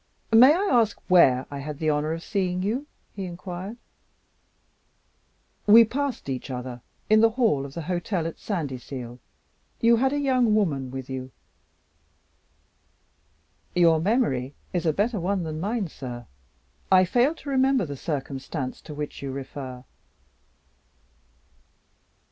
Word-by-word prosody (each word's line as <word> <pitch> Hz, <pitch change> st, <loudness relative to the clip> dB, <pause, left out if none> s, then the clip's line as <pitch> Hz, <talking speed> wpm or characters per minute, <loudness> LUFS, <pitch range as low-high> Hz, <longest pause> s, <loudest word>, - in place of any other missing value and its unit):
"May 255 Hz, +7 st, +8 dB
I -, -, 0 dB
ask 230 Hz, -5 st, +3 dB
where 130 Hz, -8 st, +6 dB
I 140 Hz, -, -5 dB
had 145 Hz, +1 st, -6 dB
the 155 Hz, 0 st, +1 dB
honor 150 Hz, +1 st, 0 dB
of 165 Hz, +1 st, -4 dB
seeing 185 Hz, -2 st, -1 dB
you?" 245 Hz, +9 st, -2 dB, 0.3 s
he 195 Hz, -2 st, -4 dB
inquired. 180 Hz, +4 st, -7 dB, 1.9 s
"We 225 Hz, +2 st, +9 dB
passed 275 Hz, -, -3 dB
each 130 Hz, 0 st, -4 dB
other 125 Hz, -1 st, -6 dB, 0.3 s
in 215 Hz, 0 st, +5 dB
the 225 Hz, -, +6 dB
hall 220 Hz, -, +1 dB
of 135 Hz, -, -14 dB
the 170 Hz, -, -4 dB
hotel 175 Hz, +1 st, -2 dB
at 165 Hz, -, -5 dB
Sandyseal. 130 Hz, -, -5 dB, 0.6 s
You 230 Hz, 0 st, +5 dB
had 265 Hz, +3 st, +2 dB
a 290 Hz, -, -1 dB
young 255 Hz, -6 st, +2 dB
woman 145 Hz, -11 st, 0 dB
with 130 Hz, 0 st, -6 dB
you." 130 Hz, -1 st, -5 dB, 2.5 s
"Your 165 Hz, -3 st, +4 dB
memory 160 Hz, -, 0 dB, 0.2 s
is 175 Hz, -2 st, 0 dB
a -, -, +4 dB
better 210 Hz, +5 st, 0 dB
one 185 Hz, +1 st, -1 dB
than 155 Hz, -1 st, -4 dB
mine, 205 Hz, +2 st, -1 dB
sir. 125 Hz, -5 st, -8 dB, 0.7 s
I 185 Hz, -1 st, +7 dB
fail 245 Hz, -, +2 dB
to 295 Hz, -, -9 dB
remember 265 Hz, -4 st, +3 dB
the 145 Hz, -2 st, -6 dB
circumstance 135 Hz, -1 st, -4 dB
to 150 Hz, -, -9 dB
which 150 Hz, 0 st, -6 dB
you 140 Hz, -1 st, -4 dB
refer." 130 Hz, -1 st, -7 dB
175 Hz, 135 wpm, -25 LUFS, 140-220 Hz, 2.5 s, We